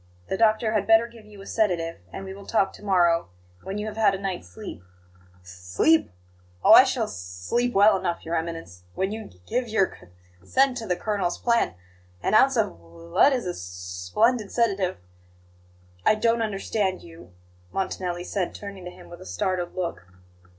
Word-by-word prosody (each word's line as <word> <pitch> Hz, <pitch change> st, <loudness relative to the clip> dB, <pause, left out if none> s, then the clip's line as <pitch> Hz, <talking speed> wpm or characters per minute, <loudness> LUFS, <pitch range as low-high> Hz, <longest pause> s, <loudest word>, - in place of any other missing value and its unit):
The -, -, 0 dB
doctor 220 Hz, 0 st, +3 dB
had 215 Hz, -, 0 dB
better 225 Hz, +1 st, +6 dB
give 230 Hz, -2 st, -14 dB
you 210 Hz, -1 st, -14 dB
a -, -, -13 dB
sedative, 175 Hz, -8 st, 0 dB
and 195 Hz, -, -7 dB
we 190 Hz, -, -6 dB
will 200 Hz, 0 st, -12 dB
talk 195 Hz, -4 st, +1 dB
to -, -, -14 dB
morrow, 175 Hz, -, +3 dB, 0.3 s
when 195 Hz, +2 st, -5 dB
you 210 Hz, -, -3 dB
have 215 Hz, 0 st, -6 dB
had 205 Hz, -3 st, +4 dB
a -, -, -6 dB
night's 185 Hz, -, -4 dB
sleep." 90 Hz, -1 st, -9 dB, 0.6 s
"S 90 Hz, -, -12 dB
sleep? 90 Hz, -, +2 dB, 0.5 s
Oh, -, -, +6 dB
I -, -, +11 dB
shall -, -, 0 dB
s -, -, -5 dB
sleep 90 Hz, -, -2 dB
well 205 Hz, +2 st, +6 dB
enough, 175 Hz, -2 st, -2 dB
Your 165 Hz, +1 st, -2 dB
Eminence, 165 Hz, -, -5 dB
when 190 Hz, +1 st, -1 dB
you 220 Hz, 0 st, -5 dB
g 90 Hz, -, -16 dB
give 250 Hz, -, -1 dB
your 215 Hz, -4 st, +1 dB
c -, -, -17 dB, 0.3 s
consent 260 Hz, -, +2 dB
to 225 Hz, -3 st, -5 dB
the 180 Hz, -, +1 dB
colonel's 195 Hz, -3 st, -1 dB
plan 235 Hz, -, +1 dB, 0.5 s
an -, -, 0 dB
ounce 265 Hz, +4 st, +5 dB
of 220 Hz, -, +3 dB
l 85 Hz, 0 st, -15 dB
lead 285 Hz, -, +6 dB
is 255 Hz, -5 st, -1 dB
a 180 Hz, -, -1 dB
s -, -, -8 dB
splendid 90 Hz, -, -1 dB
sedative." 200 Hz, -6 st, +1 dB, 1.1 s
"I -, -, +5 dB
don't 230 Hz, +2 st, +2 dB
understand 200 Hz, -2 st, -1 dB
you," 165 Hz, -, -14 dB, 0.4 s
Montanelli 180 Hz, -2 st, -3 dB
said, 180 Hz, 0 st, -3 dB
turning 200 Hz, -3 st, -8 dB
to -, -, -5 dB
him -, -, -14 dB
with 175 Hz, -, -11 dB
a -, -, -10 dB
startled 175 Hz, -, -2 dB
look. 170 Hz, -, -4 dB
190 Hz, 190 wpm, -25 LUFS, 165-215 Hz, 1.1 s, I